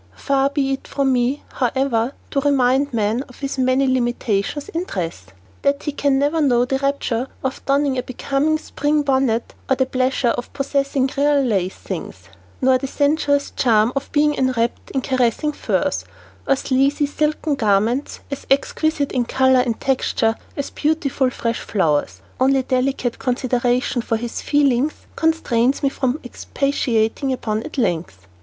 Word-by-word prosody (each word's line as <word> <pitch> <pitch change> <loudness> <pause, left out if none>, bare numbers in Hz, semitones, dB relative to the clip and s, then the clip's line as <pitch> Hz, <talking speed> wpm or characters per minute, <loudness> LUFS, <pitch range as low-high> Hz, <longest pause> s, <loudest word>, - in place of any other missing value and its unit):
Far 275 - +1
be 280 -1 0
it 270 - -6
from 275 -2 +1
me, 250 +3 0
however, 255 -1 0 0.2
to 275 - +1
remind 275 0 +2
man 220 +1 0
of 250 - -16
his 275 -1 -3
many 255 +1 +3
limitations 240 0 0
in 335 +2 -3
dress. 165 - -4 0.4
That 280 0 +1
he 295 - -1
can 280 -1 +1
never 290 +4 +1
know 245 -4 +3
the 265 +1 -1
rapture 270 -3 -1 0.2
of 265 0 -3
donning 275 -1 +2
a - - 0
becoming 275 +5 0
spring 295 -1 -1
bonnet, 265 -4 +1 0.2
nor 265 - +4
the 260 - +1
pleasure 255 -1 +1
of 245 - -3
possessing 275 -1 0
"real 285 0 +3
lace" 195 -7 0
things, - - -7 0.3
nor 260 0 +4
the 270 - -3
sensuous 285 0 +1
charm 225 -1 +2
of 275 - -3
being 295 0 +3
enwrapped 255 -4 -1
in 265 - -1
caressing 260 +3 +1
furs, 185 - -1 0.4
or - - +4
sleazy, 275 +3 +1
silken 300 +1 -1
garments 225 +2 +1
as 280 - -6
exquisite 285 +1 +1
in 245 -2 0
color 260 +1 +3
and 240 -3 0
texture 250 -4 +1 0.2
as 280 - -3
beautiful, 290 -4 0
fresh 230 -2 -2
flowers, 145 - 0 0.2
only 265 +1 +3
delicate 255 -1 -1
consideration 250 -1 0
for 225 -1 -1
his 235 +1 -5
feelings 285 0 +2 0.2
constrains 280 -6 +1
me 275 - +4
from 265 +1 -1
expatiating 255 -1 -1
upon 220 -4 -2
at 305 - -8
length. 165 - -1
265 Hz, 155 wpm, -20 LUFS, 240-280 Hz, 0.4 s, nor